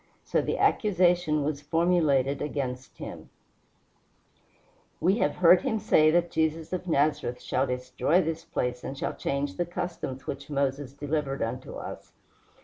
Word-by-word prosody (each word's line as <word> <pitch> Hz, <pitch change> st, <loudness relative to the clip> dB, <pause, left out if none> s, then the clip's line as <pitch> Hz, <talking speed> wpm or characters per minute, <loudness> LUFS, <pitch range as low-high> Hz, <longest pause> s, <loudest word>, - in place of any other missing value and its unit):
So -, -, +1 dB
the -, -, -2 dB
accusation 175 Hz, -6 st, +3 dB
was 145 Hz, 0 st, -2 dB
formulated 150 Hz, -4 st, +2 dB
against 130 Hz, -3 st, -4 dB
him: -, -, -8 dB, 1.7 s
"We 190 Hz, +7 st, +2 dB
have 145 Hz, -, +1 dB
heard 180 Hz, 0 st, +6 dB
him 260 Hz, -5 st, 0 dB
say 155 Hz, -6 st, +4 dB
that 170 Hz, +1 st, +2 dB
Jesus 160 Hz, +1 st, -1 dB
of 180 Hz, 0 st, -3 dB
Nazareth 145 Hz, -5 st, +1 dB
shall 130 Hz, +2 st, 0 dB
destroy 125 Hz, +6 st, +1 dB
this 165 Hz, -2 st, -2 dB
place 125 Hz, -6 st, -3 dB
and 135 Hz, -, -5 dB
shall -, -, -2 dB
change 140 Hz, 0 st, -2 dB
the 175 Hz, -, 0 dB
customs 170 Hz, -7 st, -5 dB
which 140 Hz, +1 st, -6 dB
Moses 140 Hz, -1 st, -1 dB
delivered 145 Hz, -1 st, -2 dB
unto 125 Hz, +3 st, -5 dB
us." -, -, -8 dB
150 Hz, 140 wpm, -27 LUFS, 135-170 Hz, 1.7 s, heard